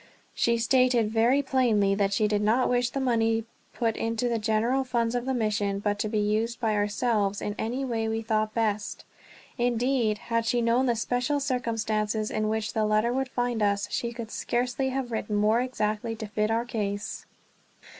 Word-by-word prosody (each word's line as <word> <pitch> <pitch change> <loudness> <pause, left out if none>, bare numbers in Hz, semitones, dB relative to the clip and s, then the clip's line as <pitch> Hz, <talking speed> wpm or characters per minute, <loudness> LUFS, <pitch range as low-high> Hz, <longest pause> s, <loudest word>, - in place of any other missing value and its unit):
She 235 0 +2
stated 240 -2 +3
very 240 +5 +3
plainly 235 -7 +2
that 200 0 +1
she 210 +1 +2
did 210 -1 0
not 225 +5 +3
wish 245 0 +1
the 275 - -3
money 225 -3 +1 0.3
put 225 -2 -1
into 230 +1 -1
the 235 -1 0
general 225 +5 +1
funds 235 -2 0
of 245 0 -2
the 265 - +1
mission, 205 -3 0
but 205 0 -1
to 215 - -1
be 215 - -1
used 215 +3 0
by 225 -3 +1
ourselves 205 -1 0
in 205 - -3
any 250 +5 -2
way 225 -3 -1
we 225 0 -2
thought 215 0 0
best. 215 -2 -1 0.5
Indeed, 240 -2 +1
had 230 0 -2
she 245 - +2
known 235 +3 +2
the 240 - +2
special 245 +5 0
circumstances 220 -5 -1
in 215 0 0
which 220 -1 -2
the 220 -1 +1
letter 215 +3 +2
would 265 0 -1
find 245 -2 -1
us, 200 -1 +1
she 235 - -2
could 235 -2 -7
scarcely 250 +2 -1
have 260 -2 -3
written 215 -2 -2
more 215 +3 +3
exactly 225 -3 -2
to 220 0 -6
fit 210 +1 -1
our 230 +1 0
case. 205 -4 -4
225 Hz, 185 wpm, -27 LUFS, 215-245 Hz, 0.5 s, stated